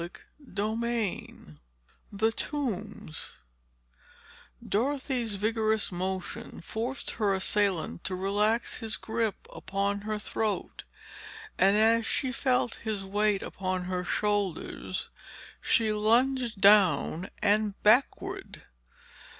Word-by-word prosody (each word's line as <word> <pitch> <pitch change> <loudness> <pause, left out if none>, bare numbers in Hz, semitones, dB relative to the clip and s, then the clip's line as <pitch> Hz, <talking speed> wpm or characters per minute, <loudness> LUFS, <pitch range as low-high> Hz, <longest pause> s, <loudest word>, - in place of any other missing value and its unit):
Chapter 170 +1 -9 0.6
XVII 220 - -3 0.5
"THE 220 +2 +1
TOMBS" 225 - -4 1.3
Dorothy's 250 -1 0
vigorous 220 +1 +1
motion 185 +1 -4
forced 235 +9 -3
her 205 -3 +1
assailant 190 -3 +1
to 185 - -1
relax 205 +5 +1
his 225 -2 -2
grip 225 -2 -2
upon 200 +1 -2
her 215 +1 -2
throat, 210 0 -3 0.7
and 195 +2 +5
as 225 +1 +4
she 260 -2 0
felt 250 -1 +1
his 215 -3 -3
weight 205 0 +1
upon 185 -1 -3
her 180 0 -2
shoulders, 205 -2 -1 0.5
she 220 -2 +2
lunged 235 +1 +2
down 195 -3 +4
and 210 -1 +2
backward. 375 - +2
210 Hz, 95 wpm, -29 LUFS, 195-230 Hz, 1.3 s, and